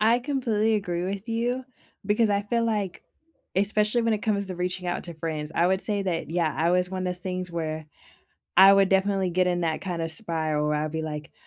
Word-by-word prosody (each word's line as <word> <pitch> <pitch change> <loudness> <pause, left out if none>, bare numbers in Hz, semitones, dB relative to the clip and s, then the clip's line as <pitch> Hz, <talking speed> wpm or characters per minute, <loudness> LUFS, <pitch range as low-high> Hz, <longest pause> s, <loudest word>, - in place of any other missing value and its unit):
I 225 +3 +4
completely 240 -5 0
agree 180 -4 -1
with 200 +4 -4
you 240 +3 -1 0.4
because 210 +1 +3
I 200 0 +1
feel 230 +3 0
like 205 -5 -2 0.5
especially 210 +4 +2
when 230 0 +2
it - - -1
comes 200 -3 0
to 185 - -5
reaching 180 +1 -3
out 175 - -2
to 170 -1 -7
friends, 155 -1 -4
I 170 - +3
would 190 0 +1
say 205 -2 -1
that, 180 -4 -2
yeah, 165 -2 +1
I 165 +2 +2
was 180 0 +1
one 185 -1 -3
of 180 0 -2
things 185 -1 -4
where 155 -2 -3 0.7
I 190 +2 +9
would 195 -1 +5
definitely 195 -1 +2
get 180 +1 +2
in 175 -1 0
that 160 -2 -1
kind 180 -3 -3
of 165 0 -3
spiral 160 -6 -1
where 150 - +1
I'd 155 - -4
be, 160 0 -2
like, 150 0 -6
185 Hz, 220 wpm, -26 LUFS, 170-210 Hz, 0.7 s, I